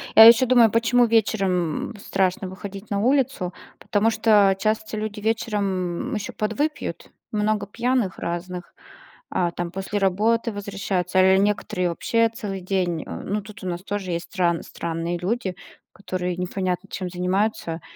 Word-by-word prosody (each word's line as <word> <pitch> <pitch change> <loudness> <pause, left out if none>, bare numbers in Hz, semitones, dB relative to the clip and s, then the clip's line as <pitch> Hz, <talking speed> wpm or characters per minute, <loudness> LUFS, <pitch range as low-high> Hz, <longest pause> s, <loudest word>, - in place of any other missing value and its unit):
Я 220 - +11
ещё 235 +3 +8
думаю, 240 -2 +6
почему 235 +2 +4
вечером, 195 -7 +1
м, - - -11
страшно 190 0 -1
выходить 195 +2 -9
на 200 - +1
улицу, 255 -6 +1 0.3
потому 215 +2 +1
что 210 -3 +4
часто 215 +1 -1
люди 215 -1 -4
вечером, 205 -2 -1
м, - - -3
еще 210 -2 -4
подвыпьют, 255 +9 -2 0.2
много 210 -1 0
пьяных 235 -1 -1
разных, 175 +1 -5 0.6
а 175 -1 +1
там 175 0 -4
после 195 +1 -3
работы 215 +4 +2
возвращаются, 195 -3 -1
или 190 0 +6
некоторые 200 -2 0
вообще 230 +7 +1
целый 205 -4 -5
день. 180 -3 -1
Э, - - -6
ну, 210 +1 -2
тут 210 0 -12
у - - -4
нас 175 0 -3
тоже 200 -2 -3
есть 170 0 -2
стран 175 -4 +1
странные 170 +1 -3
люди, 190 +1 -2 0.4
которые 185 -2 -3
непонятно 185 +1 -2
чем 185 -2 -4
занимаются, 180 -1 -1
200 Hz, 150 wpm, -23 LUFS, 180-220 Hz, 0.6 s, Я